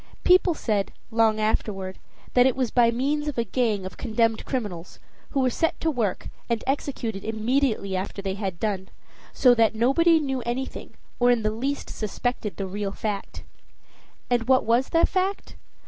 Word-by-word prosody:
People 360 Hz, -2 st, +5 dB
said, 210 Hz, -7 st, -1 dB, 0.2 s
long 225 Hz, -1 st, +3 dB
afterward, 195 Hz, -3 st, -1 dB, 0.3 s
that 250 Hz, +1 st, +6 dB
it 260 Hz, -, +1 dB
was 255 Hz, -3 st, -1 dB
by 240 Hz, -2 st, +4 dB
means 285 Hz, +6 st, 0 dB
of 295 Hz, -, -3 dB
a 235 Hz, -, +2 dB
gang 220 Hz, -3 st, 0 dB
of 185 Hz, -, -8 dB
condemned 225 Hz, 0 st, 0 dB
criminals, 200 Hz, -10 st, -4 dB, 0.3 s
who 275 Hz, -, 0 dB
were 255 Hz, -, +3 dB
set 325 Hz, +7 st, 0 dB
to 325 Hz, -, +1 dB
work, 225 Hz, -9 st, -2 dB, 0.2 s
and 235 Hz, -1 st, 0 dB
executed 255 Hz, -6 st, -2 dB
immediately 220 Hz, -2 st, 0 dB
after 190 Hz, +2 st, -4 dB
they 195 Hz, -1 st, -2 dB
had 190 Hz, -4 st, -4 dB
done, 195 Hz, -3 st, -2 dB, 0.4 s
so 250 Hz, -2 st, +5 dB
that 225 Hz, -2 st, +3 dB
nobody 320 Hz, +9 st, +4 dB
knew 270 Hz, -4 st, -2 dB
anything, 240 Hz, +3 st, -5 dB, 0.2 s
or 245 Hz, 0 st, +4 dB
in 240 Hz, -2 st, +3 dB
the 215 Hz, -, +1 dB
least 270 Hz, +6 st, -3 dB
suspected 215 Hz, 0 st, -3 dB
the 195 Hz, -, -2 dB
real 200 Hz, +1 st, -3 dB
fact. 205 Hz, -1 st, -4 dB, 0.8 s
And 240 Hz, -2 st, 0 dB
what 260 Hz, -1 st, +4 dB
was 235 Hz, +4 st, +2 dB
the 330 Hz, -, +4 dB
fact? 385 Hz, +1 st, -2 dB
230 Hz, 170 wpm, -25 LUFS, 210-265 Hz, 0.8 s, that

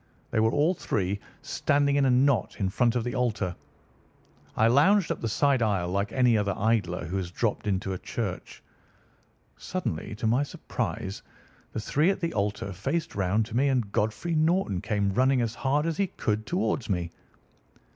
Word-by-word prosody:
They -, -, +1 dB
were 110 Hz, 0 st, +4 dB
all 150 Hz, +7 st, +3 dB
three 100 Hz, -, -2 dB, 0.2 s
standing 140 Hz, 0 st, +1 dB
in 140 Hz, -1 st, +3 dB
a -, -, +4 dB
knot 125 Hz, -3 st, +2 dB
in 95 Hz, -2 st, 0 dB
front 120 Hz, +4 st, +2 dB
of 120 Hz, -, +1 dB
the 120 Hz, 0 st, -3 dB
altar. 105 Hz, -8 st, -1 dB, 1.0 s
I 110 Hz, -, +4 dB
lounged 160 Hz, -, +4 dB
up -, -, -3 dB
the 115 Hz, -, -1 dB
side 140 Hz, +3 st, +2 dB
aisle 100 Hz, -6 st, +1 dB
like 100 Hz, +4 st, -1 dB
any 125 Hz, -3 st, +3 dB
other 100 Hz, -2 st, 0 dB
idler 100 Hz, -6 st, 0 dB
who 90 Hz, +4 st, -3 dB
has 90 Hz, -2 st, -3 dB
dropped 105 Hz, +3 st, -2 dB
into 95 Hz, -1 st, -1 dB
a 90 Hz, -, -5 dB
church. -, -, -5 dB, 0.9 s
Suddenly, 115 Hz, -, -4 dB
to 110 Hz, -, -4 dB
my 120 Hz, +5 st, +3 dB
surprise, 100 Hz, -8 st, -4 dB, 0.5 s
the -, -, -3 dB
three 150 Hz, -, +2 dB
at 195 Hz, -, 0 dB
the 170 Hz, -2 st, -2 dB
altar 105 Hz, -1 st, -2 dB
faced 160 Hz, -, -2 dB
round 100 Hz, +3 st, +1 dB
to 115 Hz, +1 st, -8 dB
me, 135 Hz, +3 st, +3 dB
and 125 Hz, -7 st, 0 dB
Godfrey 110 Hz, +13 st, -1 dB
Norton 155 Hz, -, +1 dB
came 100 Hz, -2 st, 0 dB
running 130 Hz, +4 st, +3 dB
as 115 Hz, -1 st, -1 dB
hard 140 Hz, +5 st, 0 dB
as 165 Hz, -1 st, -1 dB
he 200 Hz, -, +1 dB
could 110 Hz, -9 st, -2 dB
towards 175 Hz, -, -1 dB
me. 90 Hz, -4 st, -1 dB
115 Hz, 180 wpm, -27 LUFS, 100-140 Hz, 1.0 s, were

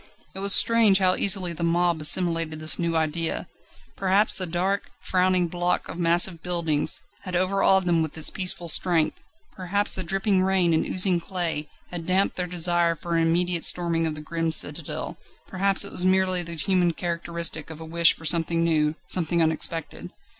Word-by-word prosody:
It 190 Hz, -, -7 dB
was 200 Hz, 0 st, +6 dB
strange 230 Hz, -4 st, +4 dB
how 185 Hz, -1 st, +2 dB
easily 185 Hz, -3 st, +1 dB
the 170 Hz, -, -10 dB
mob 170 Hz, -1 st, 0 dB
assimilated 165 Hz, -1 st, +3 dB
this 155 Hz, 0 st, +2 dB
new 170 Hz, -1 st, -2 dB
idea. 160 Hz, +1 st, -2 dB, 0.5 s
Perhaps 195 Hz, +2 st, +1 dB
the 185 Hz, -, -3 dB
dark, 185 Hz, +4 st, -2 dB
frowning 185 Hz, -1 st, +1 dB
block 175 Hz, +1 st, -2 dB
of 175 Hz, -, -8 dB
massive 170 Hz, 0 st, +2 dB
buildings 165 Hz, -4 st, -1 dB, 0.2 s
had 185 Hz, -2 st, -7 dB
overawed 190 Hz, +1 st, +1 dB
them 170 Hz, -2 st, +1 dB
with 160 Hz, 0 st, -5 dB
its 160 Hz, -, +3 dB
peaceful 180 Hz, -2 st, -2 dB
strength, 160 Hz, -2 st, +1 dB, 0.3 s
perhaps 200 Hz, +2 st, -2 dB
the 185 Hz, -, -1 dB
dripping 195 Hz, +2 st, 0 dB
rain 185 Hz, -3 st, +1 dB
and 160 Hz, -, 0 dB
oozing 185 Hz, -1 st, +2 dB
clay 170 Hz, -4 st, -4 dB, 0.2 s
had 170 Hz, -2 st, -7 dB
damped 190 Hz, +2 st, 0 dB
their 180 Hz, -1 st, -3 dB
desire 175 Hz, -1 st, +1 dB
for 170 Hz, +1 st, -5 dB
an 165 Hz, -, +1 dB
immediate 170 Hz, +1 st, 0 dB
storming 170 Hz, -2 st, 0 dB
of 155 Hz, -, -4 dB
the 150 Hz, -, -9 dB
grim 165 Hz, +1 st, -3 dB
citadel; 155 Hz, 0 st, -1 dB, 0.3 s
perhaps 195 Hz, +1 st, +1 dB
it -, -, -8 dB
was 180 Hz, -, 0 dB
merely 185 Hz, -1 st, +1 dB
the 170 Hz, -1 st, -6 dB
human 175 Hz, +2 st, 0 dB
characteristic 170 Hz, -2 st, -3 dB
of 160 Hz, -1 st, -9 dB
a 160 Hz, -, -9 dB
wish 170 Hz, +1 st, +3 dB
for 160 Hz, -, -13 dB
something 165 Hz, +1 st, +1 dB
new, 155 Hz, -2 st, 0 dB
something 170 Hz, -1 st, -1 dB
unexpected. 160 Hz, +1 st, -2 dB
175 Hz, 175 wpm, -24 LUFS, 165-185 Hz, 0.5 s, was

